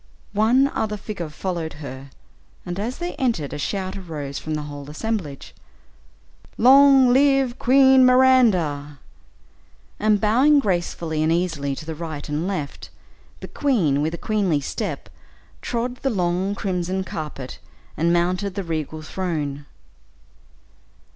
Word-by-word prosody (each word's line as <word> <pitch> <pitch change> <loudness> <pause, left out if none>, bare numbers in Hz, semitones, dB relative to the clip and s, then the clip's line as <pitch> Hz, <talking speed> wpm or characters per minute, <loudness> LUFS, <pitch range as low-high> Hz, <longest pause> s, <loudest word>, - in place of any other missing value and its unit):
One 230 +6 +4
other 210 -5 -2
figure 195 -5 -6
followed 165 0 -4
her, 140 -2 -9 0.6
and 175 +1 -5
as 235 +5 -3
they 350 +1 -4
entered, 225 - -1
a - - -5
shout 190 +4 -3
arose 150 -7 -6
from 155 0 -4
the 150 - -3
whole 145 -1 -8
assemblage, 160 -4 -4 1.0
"Long 270 0 +7
live 270 -2 +3
Queen 265 +1 +6
Miranda!" 215 - +3 1.0
And 210 -1 +3
bowing 255 +9 +4
gracefully 175 - -1
and 155 +1 +2
easily 165 -5 -1
to 155 - -9
the 160 - -5
right 155 -2 -6
and 150 +4 -2
left, 155 -8 -5 0.5
the - - -7
queen 180 - +1
with 160 +3 -1
a - - -8
queenly 200 -9 0
step, 140 - -4 0.5
trod 245 +1 -3
the 270 - -1
long 185 -1 -1
crimson 185 -1 -2
carpet 150 -7 -7 0.4
and 170 +2 +1
mounted 180 +3 0
the 200 - -3
regal 155 -2 -4
throne. 150 -5 -4
180 Hz, 130 wpm, -22 LUFS, 155-230 Hz, 1.0 s, Long